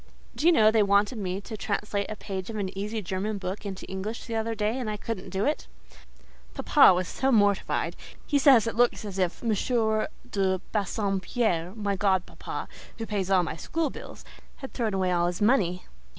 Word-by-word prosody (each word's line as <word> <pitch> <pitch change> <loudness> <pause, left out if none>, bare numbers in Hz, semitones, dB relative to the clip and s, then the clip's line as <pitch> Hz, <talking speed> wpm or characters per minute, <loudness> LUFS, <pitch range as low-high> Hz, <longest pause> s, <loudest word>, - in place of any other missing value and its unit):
Do 315 - +1
you - - +8
know 215 -9 +5
they 220 -1 +4
wanted 205 +3 +2
me 190 0 -3
to 220 - -7
translate 205 -1 -2
a 215 - -4
page 190 -1 -6
of 225 - -5
an 195 -3 -3
easy 210 +2 -3
German 190 +4 -2
book 195 +2 -5
into 190 -1 -6
English 195 +4 -5
the 230 - -6
other 225 0 -1
day, 215 +4 -1
and 240 -4 -3
I 210 - -3
couldn't 215 -2 -5
do 195 +1 -1
it. - - -1 0.9
Papa 185 - +6
was 180 0 -1
so 270 +1 0
mortified: 205 -4 +2 0.3
he 285 - +2
says 265 -5 +6
it 230 - -3
looks 240 -2 +2
as 195 -2 -5
if 180 +3 -1
M. 235 - 0 0.8
de 190 -2 +1
Bassompierre—my 200 -1 -1
godpapa, 190 -2 -1 0.3
who 225 - -4
pays 200 -4 -2
all 185 -2 +4
my 160 - -4
school 315 - -2
bills—had 265 - -12
thrown 220 -5 -1
away 185 -1 +1
all 175 -1 +2
his 175 0 -3
money. 200 -6 +2
205 Hz, 185 wpm, -27 LUFS, 190-225 Hz, 0.9 s, you